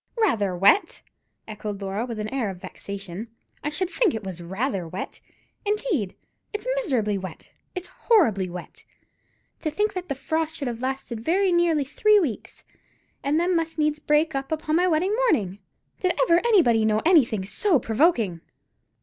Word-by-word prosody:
"Rather 210 Hz, -, +2 dB
wet!" 330 Hz, -, +3 dB, 0.4 s
echoed 210 Hz, -2 st, -5 dB
Laura, 200 Hz, +4 st, -3 dB
with 230 Hz, -3 st, -5 dB
an 210 Hz, 0 st, -3 dB
air 250 Hz, -6 st, 0 dB
of 190 Hz, -, -6 dB
vexation; 200 Hz, +2 st, -7 dB, 0.4 s
"I 295 Hz, -, 0 dB
should 355 Hz, +5 st, -1 dB
think 425 Hz, -, +2 dB
it 220 Hz, -, -5 dB
was 185 Hz, -3 st, -6 dB
rather 190 Hz, +1 st, -2 dB
wet, 180 Hz, +4 st, -6 dB, 0.4 s
indeed. 410 Hz, -, -1 dB, 0.4 s
It's 420 Hz, -, -4 dB
miserably 235 Hz, -, 0 dB
wet; 185 Hz, -4 st, -9 dB, 0.2 s
it's 365 Hz, 0 st, -5 dB
horribly 335 Hz, -, +2 dB
wet. 180 Hz, 0 st, -9 dB, 0.8 s
To 310 Hz, -, -1 dB
think 415 Hz, +7 st, 0 dB
that 365 Hz, -2 st, -5 dB
the 275 Hz, -, -1 dB
frost 320 Hz, +3 st, -2 dB
should 280 Hz, -4 st, -3 dB
have 235 Hz, -1 st, -4 dB
lasted 260 Hz, -3 st, -3 dB
very 365 Hz, -, +2 dB
nearly 340 Hz, -4 st, +3 dB
three 425 Hz, -, +4 dB
weeks, 285 Hz, -, -4 dB, 0.6 s
and 290 Hz, +3 st, +2 dB
then 355 Hz, +1 st, +2 dB
must 325 Hz, -1 st, -1 dB
needs 305 Hz, -1 st, +1 dB
break 300 Hz, +2 st, +2 dB
up 275 Hz, +4 st, -3 dB
on 310 Hz, -, +2 dB
my 360 Hz, +2 st, +3 dB
wedding 365 Hz, +5 st, +2 dB
morning. 205 Hz, -, +1 dB, 0.4 s
Did 365 Hz, -1 st, 0 dB
ever 340 Hz, -8 st, +5 dB
anybody 340 Hz, -, +4 dB
know 215 Hz, 0 st, +2 dB
anything 245 Hz, -, +4 dB
so 335 Hz, -, +2 dB
provoking?" 225 Hz, -, +1 dB
280 Hz, 165 wpm, -25 LUFS, 210-350 Hz, 0.8 s, ever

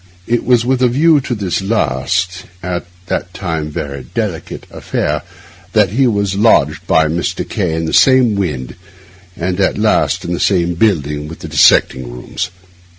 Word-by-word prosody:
It 120 Hz, +1 st, 0 dB
was 120 Hz, -2 st, +3 dB
with 130 Hz, 0 st, +1 dB
a 125 Hz, -, +5 dB
view 150 Hz, +5 st, +4 dB
to 125 Hz, -1 st, -3 dB
this 100 Hz, -3 st, -2 dB
last—at 90 Hz, -, -2 dB, 0.2 s
that 90 Hz, 0 st, -3 dB
time 80 Hz, -5 st, -3 dB
very 70 Hz, -3 st, -6 dB
delicate—affair 75 Hz, 0 st, -3 dB, 0.5 s
that 105 Hz, -4 st, +4 dB
he 130 Hz, +4 st, +2 dB
was 100 Hz, -3 st, 0 dB
lodged 90 Hz, -6 st, +2 dB
by 80 Hz, -, +4 dB
Mr. 80 Hz, +3 st, -2 dB
K— 80 Hz, -, -1 dB
in 80 Hz, 0 st, -2 dB
the 80 Hz, -, -3 dB
same 130 Hz, -4 st, +5 dB
wynd, 70 Hz, -11 st, -3 dB, 0.6 s
and 90 Hz, +2 st, -2 dB
at 95 Hz, -, +1 dB
last 105 Hz, 0 st, +1 dB
in 85 Hz, -, -2 dB
the 85 Hz, -, -2 dB
same 90 Hz, -3 st, +2 dB
building, 75 Hz, -7 st, 0 dB
with 80 Hz, -, -10 dB
the -, -, -6 dB
dissecting 65 Hz, -2 st, +3 dB
rooms. -, -, -5 dB
90 Hz, 155 wpm, -16 LUFS, 80-110 Hz, 0.6 s, a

